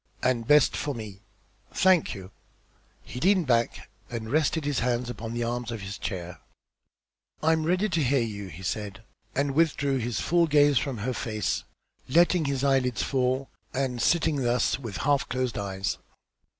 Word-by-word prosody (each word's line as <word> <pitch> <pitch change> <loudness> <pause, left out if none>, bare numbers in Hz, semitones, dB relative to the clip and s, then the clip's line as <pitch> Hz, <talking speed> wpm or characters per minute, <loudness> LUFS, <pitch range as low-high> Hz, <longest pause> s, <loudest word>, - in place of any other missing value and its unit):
"And 120 -3 +1
best 150 -2 +5
for 145 -2 -2
me. 105 -3 -8 0.5
Thank 185 -8 +3
you." 95 -1 -10 0.7
He 125 - -7
leaned 185 +3 +3
back 120 -3 +1 0.2
and 115 -2 -5
rested 155 +1 +1
his 145 -2 0
hands 120 +1 0
upon 115 0 -6
the 120 - -1
arms 120 0 -2
of 115 -3 -5
his 95 +1 -6
chair. 90 -3 -5 1.0
"I 160 - +4
am 160 -1 0
ready 185 +4 +2
to 170 -3 +1
hear 135 +1 +3
you," 100 -3 -5
he 90 +1 -10
said, 100 +1 -4 0.3
and 140 +1 +1
withdrew 145 -3 +2
his 120 -1 -2
full 170 0 +2
gaze 145 -3 +5
from 135 -5 -3
her 130 - 0
face, 110 -5 -2 0.4
letting 170 +2 +4
his 140 -1 -1
eyelids 135 -3 +2
fall 130 0 0 0.2
and 130 -3 -1
sitting 160 -3 +2
thus 125 +1 +1
with 115 -7 -6
half 145 -1 +2
closed 130 -1 -1
eyes. 95 -1 -3
125 Hz, 165 wpm, -27 LUFS, 115-145 Hz, 1.0 s, best